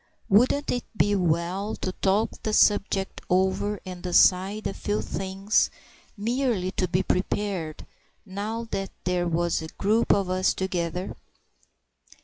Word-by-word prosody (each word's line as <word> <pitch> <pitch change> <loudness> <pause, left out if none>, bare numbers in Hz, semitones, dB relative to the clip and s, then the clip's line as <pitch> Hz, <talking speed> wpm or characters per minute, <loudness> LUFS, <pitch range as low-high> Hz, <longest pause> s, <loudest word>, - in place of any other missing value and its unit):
Wouldn't 255 +8 +3
it 245 - -1
be 205 0 +3
well 180 +3 0
to 185 - -3
talk 195 +4 +1
the 215 - -2
subject 200 -2 +2
over 190 +2 +1
and 180 -1 -7
decide 185 +3 +3
a - - -1
few 210 0 -2
things—merely 205 +2 -1
to 185 - -1
be 180 +2 +1
prepared—now 200 +4 -4
that 195 -1 -2
there 180 -1 0
was 170 0 0
a 160 - -6
group 215 +7 +1
of 200 -2 +3
us 185 +1 +1
together. 180 -1 -2
190 Hz, 125 wpm, -26 LUFS, 180-210 Hz, -, Wouldn't